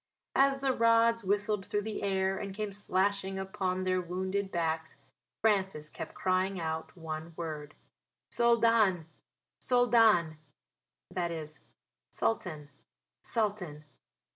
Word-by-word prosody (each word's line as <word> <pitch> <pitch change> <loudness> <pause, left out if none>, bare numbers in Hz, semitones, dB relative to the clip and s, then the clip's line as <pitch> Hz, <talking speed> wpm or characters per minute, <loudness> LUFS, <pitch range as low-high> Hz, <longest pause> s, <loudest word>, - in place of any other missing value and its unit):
As 275 0 +4
the 270 -1 +2
rods 230 -1 +4
whistled 205 +1 0
through 205 0 -1
the 220 0 -4
air 190 -1 +1
and 195 -1 -5
came 210 -1 -3
slashing 195 0 0
upon 190 -1 -2
their 185 0 +1
wounded 190 +3 -2
backs 160 -2 -2 0.5
Francis 190 -8 +1
kept - - -7
crying 185 +1 0
out 160 +1 -4
one 160 0 -6
word 150 -3 -5 0.6
"Soldan 230 -7 +3 0.6
Soldan." 225 -10 +4 0.7
That 175 - -1
is 155 -2 -6 0.5
"Sultan 155 -10 -2 0.5
Sultan." 195 -9 -2
190 Hz, 110 wpm, -31 LUFS, 170-215 Hz, 0.7 s, As